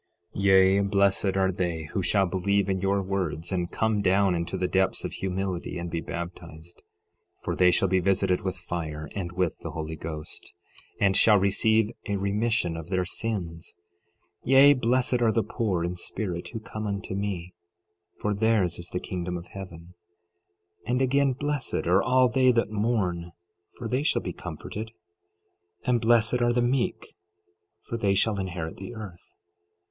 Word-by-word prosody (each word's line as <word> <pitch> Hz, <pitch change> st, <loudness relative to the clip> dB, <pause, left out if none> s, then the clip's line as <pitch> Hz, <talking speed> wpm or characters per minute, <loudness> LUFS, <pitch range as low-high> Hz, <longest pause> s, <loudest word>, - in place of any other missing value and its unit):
Yea, 95 Hz, 0 st, +5 dB
blessed 100 Hz, -1 st, +2 dB
are 95 Hz, -1 st, +3 dB
they 85 Hz, -3 st, -2 dB
who 95 Hz, -, 0 dB
shall 95 Hz, +2 st, +2 dB
believe 95 Hz, +2 st, +1 dB
in 95 Hz, -1 st, -1 dB
your 100 Hz, 0 st, +1 dB
words, 90 Hz, -4 st, -2 dB
and 90 Hz, -2 st, -1 dB
come 110 Hz, -2 st, +1 dB
down 95 Hz, 0 st, +3 dB
into 85 Hz, -1 st, -2 dB
the 90 Hz, -, 0 dB
depths 95 Hz, +1 st, +1 dB
of -, -, -3 dB
humility 95 Hz, -2 st, -3 dB
and 85 Hz, -1 st, -5 dB
be 85 Hz, 0 st, -2 dB
baptized, 85 Hz, -1 st, -8 dB, 0.6 s
for -, -, -2 dB
they 90 Hz, -1 st, +5 dB
shall 95 Hz, +2 st, +3 dB
be 95 Hz, 0 st, +2 dB
visited 90 Hz, -1 st, +1 dB
with 95 Hz, -1 st, -3 dB
fire 80 Hz, -3 st, -5 dB
and 90 Hz, -3 st, -3 dB
with 90 Hz, -2 st, -1 dB
the -, -, -6 dB
Holy 80 Hz, 0 st, -5 dB
Ghost, 75 Hz, 0 st, -7 dB, 0.5 s
and 95 Hz, -1 st, +3 dB
shall 105 Hz, 0 st, +6 dB
receive 110 Hz, +3 st, +2 dB, 0.2 s
a 100 Hz, -, 0 dB
remission 100 Hz, -2 st, 0 dB
of 80 Hz, 0 st, -7 dB
their 95 Hz, -1 st, 0 dB
sins. 90 Hz, -5 st, -4 dB, 0.7 s
12:3 130 Hz, -, -3 dB
Yea, 140 Hz, +2 st, +8 dB
blessed 125 Hz, -1 st, +1 dB
are 115 Hz, -2 st, +4 dB
the 115 Hz, 0 st, +1 dB
poor 100 Hz, -8 st, -1 dB
in 85 Hz, +1 st, -2 dB
spirit 90 Hz, -1 st, -4 dB
who 115 Hz, -, -6 dB
come 110 Hz, 0 st, -6 dB
unto 100 Hz, -2 st, -4 dB
me, 95 Hz, -3 st, -3 dB, 0.7 s
for 105 Hz, -, 0 dB
theirs 100 Hz, -5 st, +1 dB
is 85 Hz, -, -7 dB
the 90 Hz, -, -3 dB
kingdom 90 Hz, -1 st, -4 dB
of 85 Hz, +1 st, -10 dB
heaven. 90 Hz, -3 st, -10 dB, 0.9 s
12:4 -, -, -7 dB
And 125 Hz, -, +1 dB
again, 140 Hz, +1 st, +2 dB
blessed 145 Hz, 0 st, -2 dB
are 90 Hz, +3 st, +4 dB
all 130 Hz, 0 st, +4 dB
they 130 Hz, +1 st, +4 dB
that 115 Hz, -3 st, +1 dB
mourn, 95 Hz, -6 st, -1 dB, 0.4 s
for 115 Hz, -, -5 dB
they 125 Hz, +4 st, 0 dB
shall 150 Hz, -, +1 dB
be -, -, -4 dB
comforted. 110 Hz, +2 st, -7 dB
12:5 115 Hz, -, -18 dB, 1.0 s
And 120 Hz, -2 st, +3 dB
blessed 115 Hz, +1 st, +3 dB
are 120 Hz, 0 st, +3 dB
the 120 Hz, 0 st, +2 dB
meek, 130 Hz, -, -1 dB, 0.7 s
for 115 Hz, -, -4 dB
they 100 Hz, -3 st, +1 dB
shall 105 Hz, 0 st, +1 dB
inherit 90 Hz, -4 st, -4 dB
the 95 Hz, +5 st, -8 dB
earth. 100 Hz, -, -10 dB
95 Hz, 175 wpm, -27 LUFS, 90-110 Hz, 1.0 s, Yea